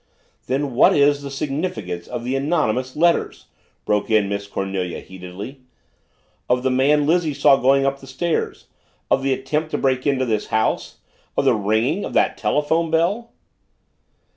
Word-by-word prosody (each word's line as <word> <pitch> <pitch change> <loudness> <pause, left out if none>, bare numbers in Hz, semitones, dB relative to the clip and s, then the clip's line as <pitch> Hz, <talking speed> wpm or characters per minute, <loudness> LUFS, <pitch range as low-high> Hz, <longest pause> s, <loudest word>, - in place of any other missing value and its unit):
"Then 135 +1 -1
what 120 - +5
is 145 0 +3
the 140 - -6
significance 135 - -4
of 120 -1 -5
the 125 +2 -2
anonymous 135 -4 0
letters?" 170 +2 +1 0.4
broke 105 +1 0
in 110 -2 +3
Miss 100 0 -4
Cornelia 95 -3 -3
heatedly. 95 +8 -9 0.9
"Of 125 0 +2
the 130 - +1
man 145 +3 +3
Lizzie 160 -2 +1
saw 140 -1 +5
going 135 +1 +3
up 135 0 0
the 135 - -13
stairs, 155 +6 -2 0.5
of - - +3
the 135 0 0
attempt 150 +4 -1
to - - -2
break 130 0 0
into 135 -2 +1
this 110 -3 -1
house 110 0 -1 0.4
of - - +2
the - - +5
ringing 110 - 0
of - - -5
that - - +2
telephone 160 +3 0
bell?" 185 +9 0
135 Hz, 160 wpm, -21 LUFS, 110-150 Hz, 0.9 s, what